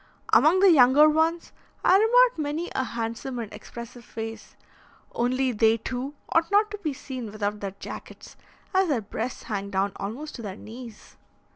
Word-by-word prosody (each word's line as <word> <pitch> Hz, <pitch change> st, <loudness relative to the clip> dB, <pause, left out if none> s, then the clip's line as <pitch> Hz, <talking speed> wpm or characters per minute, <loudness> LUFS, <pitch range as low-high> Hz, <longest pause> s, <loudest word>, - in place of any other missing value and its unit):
Among 350 Hz, +5 st, +6 dB
the 390 Hz, -2 st, +7 dB
younger 280 Hz, +1 st, +7 dB
ones 320 Hz, +2 st, +1 dB, 0.3 s
I 370 Hz, -, +6 dB
remarked 480 Hz, +2 st, +5 dB
many 305 Hz, +3 st, -3 dB
a 260 Hz, -, 0 dB
handsome 235 Hz, +2 st, -4 dB
and 225 Hz, -3 st, -6 dB
expressive 235 Hz, +3 st, -10 dB
face; 225 Hz, 0 st, -8 dB, 0.6 s
only 255 Hz, +2 st, 0 dB
they, 225 Hz, 0 st, +3 dB
too, 255 Hz, +5 st, -5 dB
ought 330 Hz, 0 st, +2 dB
not 415 Hz, +1 st, +3 dB
to 415 Hz, -, -6 dB
be 315 Hz, -7 st, -2 dB
seen 255 Hz, -5 st, -7 dB
without 210 Hz, 0 st, -3 dB
their 195 Hz, -1 st, -5 dB
jackets, -, -, -9 dB, 0.4 s
as 380 Hz, 0 st, +3 dB
their 275 Hz, -8 st, 0 dB
breasts 220 Hz, +4 st, -5 dB
hang 200 Hz, -2 st, -4 dB
down 200 Hz, 0 st, 0 dB
almost 255 Hz, +10 st, -6 dB
to -, -, -8 dB
their 200 Hz, -4 st, -6 dB
knees. 230 Hz, 0 st, -11 dB
250 Hz, 165 wpm, -26 LUFS, 225-315 Hz, 0.6 s, the